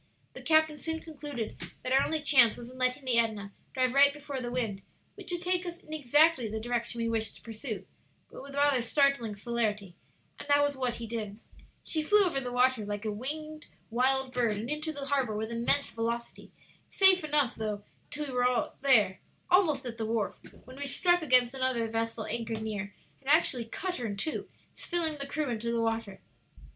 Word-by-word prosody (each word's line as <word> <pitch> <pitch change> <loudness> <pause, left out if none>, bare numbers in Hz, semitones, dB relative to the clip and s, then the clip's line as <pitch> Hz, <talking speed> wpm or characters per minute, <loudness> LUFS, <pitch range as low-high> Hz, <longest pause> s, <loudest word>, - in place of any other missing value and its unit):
The - - -9
captain 315 -1 +3
soon 320 +3 -3
concluded 290 -8 -6 0.2
that 255 - -3
our 270 +1 +5
only 315 -2 -2
chance 255 -7 +6
was 240 +1 -9
in 255 - -13
letting 255 +2 0
the 240 -2 +3
Edna 215 -3 -1 0.2
drive 255 -1 +1
right 280 +1 +7
before 285 -2 -6
the 240 - -4
wind, 225 -6 -2 0.3
which - - -6
would 350 0 -3
take 360 0 +1
us 345 -1 -6
in 315 -4 -12
exactly 295 -3 +3
the 220 +1 -3
direction 235 +1 -2
we 230 - 0
wished 225 -1 -1
to - - -13
pursue, 225 0 -6 0.5
but - - -9
with 275 +1 -10
rather 285 -3 +3
startling 245 -3 +1
celerity; 210 -4 -2 0.4
and - - -9
that 285 0 +4
was 285 -1 0
what 250 -2 -1
he 235 - -6
did. 215 -3 -5 0.5
"She 315 - -1
flew 415 +6 +5
over 320 -7 0
the 250 -1 -5
water 250 -2 +2
like 205 +1 -5
a 215 - -1
wild 205 - -6 0.7
winged 260 +2 +1
bird, 235 -4 +1
and 230 +6 -4
into 305 +1 -2
the 285 -2 -6
harbor 265 -6 0
with 220 +1 -3
immense 235 +5 +2
velocity. 235 +1 -4 0.4
Safely 370 -5 +6
enough, 290 -5 +2
though, 210 -2 -4 0.3
till 295 0 -4
we 270 - -7
were 250 -1 +1
there, 225 -9 +4 0.3
almost 315 -7 +3
at 235 -1 -6
the 220 - -1
wharf, 225 -2 -1 0.3
when 255 +1 -12
we 285 0 -4
struck 350 +6 +2
against 250 -4 +3
another 255 -3 0
vessel 225 0 -2
anchored 225 -1 -3
near, 210 -2 -4 0.3
and 275 - -8
actually 285 -6 +4
cut 360 +10 -4
her 240 - -3
in 200 -1 -5
two, 310 +10 -3 0.2
spilling 325 -4 -2
the 280 - -4
crew 305 -1 -2
into 235 0 -2
the 235 - 0
water." 225 -3 -2
250 Hz, 200 wpm, -30 LUFS, 225-290 Hz, 0.7 s, right